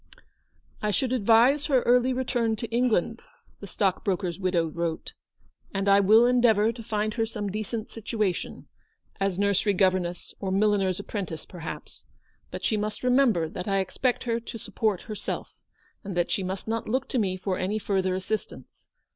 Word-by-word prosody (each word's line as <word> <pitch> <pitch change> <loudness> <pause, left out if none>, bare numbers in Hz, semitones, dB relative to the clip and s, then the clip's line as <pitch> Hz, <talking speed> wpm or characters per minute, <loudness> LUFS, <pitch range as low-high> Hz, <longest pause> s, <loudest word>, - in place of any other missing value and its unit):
" - - -47 0.3
I 210 - 0
should 250 +5 0
advise 245 +5 +4
her 265 -5 +3
early 250 +1 +4
return 245 -3 0
to 225 0 -6
England," 235 -2 +1 0.4
the 200 - -8
stockbroker's 185 -2 -1
widow 180 -3 +1
wrote, 165 0 -3 0.3
" - - -35
and 195 +1 -1
I 200 0 +6
will 215 +4 +6
endeavour 235 -3 +4
to 230 0 -9
find 215 -1 -1
her 225 -1 0
some 210 -3 -4
decent 215 +2 -4
situation 215 -4 -3 0.3
— - - -37
as 195 -2 0
nursery 200 +1 +2
governess 185 -2 0
or 195 - -3
milliner's 195 -2 +2
apprentice, 195 -6 -5
per 180 - -11
haps 165 - -8 0.2
— - - -40
but - - -7
she 215 - +1
must 210 +2 -3
remember 250 -10 +3
that 180 +4 -6
I 195 -1 +1
expect 215 +6 0
her 235 -1 0
to 230 0 -8
support 215 -3 -1
herself, 215 -2 -5 0.5
and 195 -3 -5
that 175 - +1
she - - 0
must 190 +2 -4
not 225 0 -2
look 260 +3 0
to 255 - 0
me 190 -3 0
for 185 0 -2
any 195 +4 -1
further 190 -3 0
assistance. 200 +4 -5
210 Hz, 180 wpm, -26 LUFS, 190-230 Hz, 0.5 s, I